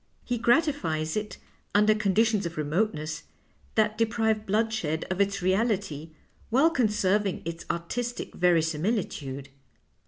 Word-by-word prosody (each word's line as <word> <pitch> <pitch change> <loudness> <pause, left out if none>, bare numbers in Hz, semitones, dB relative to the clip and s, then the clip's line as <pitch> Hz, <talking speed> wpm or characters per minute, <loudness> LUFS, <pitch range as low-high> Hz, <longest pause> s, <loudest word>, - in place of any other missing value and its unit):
He 245 -2 -1
gratifies 235 - +1
it 210 -2 -3 0.4
under 210 +1 +5
con 210 -3 0
ditions 220 -4 +3
of 170 - -9
remoteness 155 0 -1 0.5
that 215 0 +2
deprive 220 -1 +1
bloodshed 210 -7 0
of 185 +2 0
its 200 -1 0
reality 190 -6 0 0.4
while 275 +8 +4
conserving 210 - +1
its 165 0 -5
artistic 240 +8 -3
verisiniilitude." 160 - 0
205 Hz, 115 wpm, -27 LUFS, 165-225 Hz, 0.5 s, under